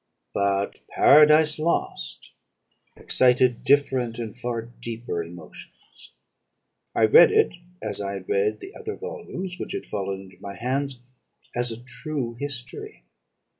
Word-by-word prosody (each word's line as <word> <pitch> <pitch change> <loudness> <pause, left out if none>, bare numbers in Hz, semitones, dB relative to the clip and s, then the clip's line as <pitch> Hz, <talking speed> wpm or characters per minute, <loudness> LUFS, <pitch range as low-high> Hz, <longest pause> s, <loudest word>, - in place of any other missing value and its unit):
"But 100 0 0
'Paradise 155 +1 +6
Lost' 65 - -2 0.6
excited 125 -1 +3
different 130 -5 +2
and 115 -3 -5
far 120 -2 -3
deeper 115 -5 -5
emotions. 85 0 -13 0.8
I - - +3
read 110 - +8
it, 435 +1 +3 0.3
as - - -4
I 100 0 -3
had 95 -2 -7
read 100 +2 +1
the 385 - -9
other 435 -2 -6
volumes 430 - -6
which - - -5
had - - -4
fallen 100 -1 -4
into 95 -1 -16
my 100 0 -7
hands, 135 +3 -2 0.6
as 120 -1 +1
a 115 +2 -8
true 130 -2 -4
history. 135 -4 -6
120 Hz, 130 wpm, -25 LUFS, 100-145 Hz, 0.8 s, read